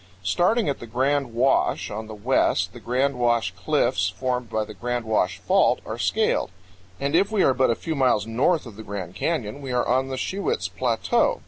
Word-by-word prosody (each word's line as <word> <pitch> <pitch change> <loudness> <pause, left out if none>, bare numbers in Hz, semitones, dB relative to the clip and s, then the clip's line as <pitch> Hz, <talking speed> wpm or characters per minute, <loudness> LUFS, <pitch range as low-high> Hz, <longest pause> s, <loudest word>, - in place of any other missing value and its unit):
Starting 175 - +2
at 140 - -1
the 120 - -9
Grand 135 +2 0
Wash 125 0 +1
on 110 +1 -5
the 110 - -8
west, 115 +6 +1
the - - -10
Grand 130 +2 0
Wash 120 -6 +1
Cliffs, 95 0 +1
formed 125 +4 -3
by 110 -1 -1
the 105 - -10
Grand 120 +2 -3
Wash 95 -6 +1
Fault, - - +3
are - - -5
scaled; - - +1 0.5
and 140 +3 0
if 195 +4 +3
we 210 -3 +2
are 135 - +4
but 130 0 +2
a 115 - +2
few 160 - -4
miles 130 -7 +2
north 135 +9 +1
of 110 -4 -11
the 110 - -8
Grand 100 -4 -6
Canyon 130 - -2
we 135 -2 -5
are 125 0 0
on 130 +2 +2
the 130 -1 -4
Shiwits 185 - -2
Plateau. 120 -3 +1
125 Hz, 205 wpm, -24 LUFS, 110-140 Hz, 0.5 s, are